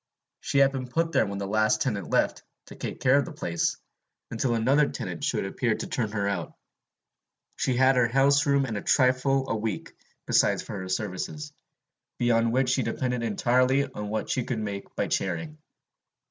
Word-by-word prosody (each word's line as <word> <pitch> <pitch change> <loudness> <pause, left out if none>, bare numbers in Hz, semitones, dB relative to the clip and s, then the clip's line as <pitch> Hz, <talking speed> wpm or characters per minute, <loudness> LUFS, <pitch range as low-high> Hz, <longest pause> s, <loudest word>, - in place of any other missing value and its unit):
She - - -2
had 135 0 +5
been 130 -2 -4
put 165 +6 0
there 110 - +2
when 100 0 -4
the 100 - -3
last 110 +1 +2
tenant 105 -9 -3
left, - - +1 0.2
to - - -12
take - - -6
care 130 +2 +5
of - - -1
the 175 - -8
place, 85 - -1 0.5
until 120 +1 0
another 135 +6 +3
tenant 90 -8 -6
should - - 0
appear - - 0
to - - -5
turn 110 -4 -2
her 100 -2 -1
out. 100 - -3 1.0
She 130 - 0
had 130 0 +4
her 125 -2 +4
houseroom 140 +2 +3
and 115 -5 -3
a - - -3
trifle 130 +1 +2
a 115 - -1
week 110 -2 -4 0.3
besides - - +2
for - - -7
her 95 0 -6
services, 110 +10 -4 0.6
beyond 115 -1 +2
which 130 +1 +1
she 130 - +2
depended 125 -1 -2
entirely 125 +5 +2
on 105 -6 -7
what 110 +1 -2
she 130 - 0
could 120 0 -3
make 100 -2 -5
by - - 0
charing. 155 -2 -3
125 Hz, 185 wpm, -27 LUFS, 110-135 Hz, 1.0 s, had